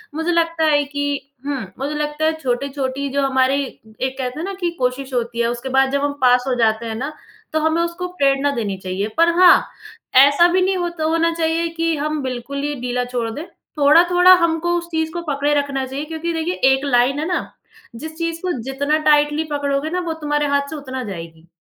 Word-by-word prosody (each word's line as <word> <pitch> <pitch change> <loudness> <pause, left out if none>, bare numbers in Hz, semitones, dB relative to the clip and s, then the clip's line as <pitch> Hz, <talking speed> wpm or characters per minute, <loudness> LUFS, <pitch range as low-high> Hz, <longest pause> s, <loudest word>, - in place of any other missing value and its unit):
मुझे 320 +2 -1
लगता 335 -1 +1
है 295 -2 +3
कि 285 0 -3 0.2
हुँ, 280 -2 -2 0.2
मुझे 285 +3 -3
लगता 300 +1 -2
है 320 - +2
छोटी-छोटी 270 +1 -2
जो 280 - +1
हमारी 265 +1 +2
एक 260 +2 -7
कहते 255 +1 -4
हैं - - -3
ना 395 - -4
कि 350 - +1
कोशिश 260 +1 -2
होती 235 -1 -2
है। 235 - +2
उसके 240 +2 -4
बाद 265 0 +3
जब 280 0 0
हम 290 0 0
पास 250 -1 +4
हो 260 - +1
जाते 220 0 +2
हैं 225 -1 -4
ना, 275 +7 -4 0.4
तो 315 - +2
हमें 320 +2 +1
उसको 340 +1 -3
प्रेरणा 275 +1 +3
देनी 205 -5 -2
चाहिए। 190 +2 -3
पर 335 +1 +5
हाँ, 365 -1 +7 0.5
ऐसा 285 +6 +7
भी 370 - +3
नहीं 380 +1 +1
होत 345 -2 -4
होना 330 +1 +2
चाहिए 330 0 0
कि 330 0 +1
हम 305 +1 -2
बिल्कुल 260 +2 -4
ही 290 0 -2
ढीला 250 0 -1
छोड़ 230 -2 -1
दें। 300 +8 -6 0.3
थोड़ा-थोड़ा 350 +5 +6
हमको 335 +1 0
उस 345 0 -5
चीज़ 320 -1 -1
को 345 - -3
पकड़े 285 +1 0
रखना 280 -2 -1
चाहिए 270 +3 -5
क्योंकि 325 +2 -4
देखिए 325 +2 -1 0.2
एक 265 +2 -2
लाइन 260 +1 +2
है 310 - -2
ना, 360 - -2 0.4
जिस 315 +7 -8
चीज़ 335 0 -3
को 370 - -1
जितना 285 +4 0
टाइटली 295 +1 +3
पकड़ोगे 285 +1 -1
ना, 360 +2 -1
वो 340 -2 -3
तुम्हारे 295 0 0
हाथ 280 0 0
से 320 - -6
उतना 260 -3 -6
जाएगी। 165 -5 -9
285 Hz, 210 wpm, -20 LUFS, 260-320 Hz, 0.5 s, हाँ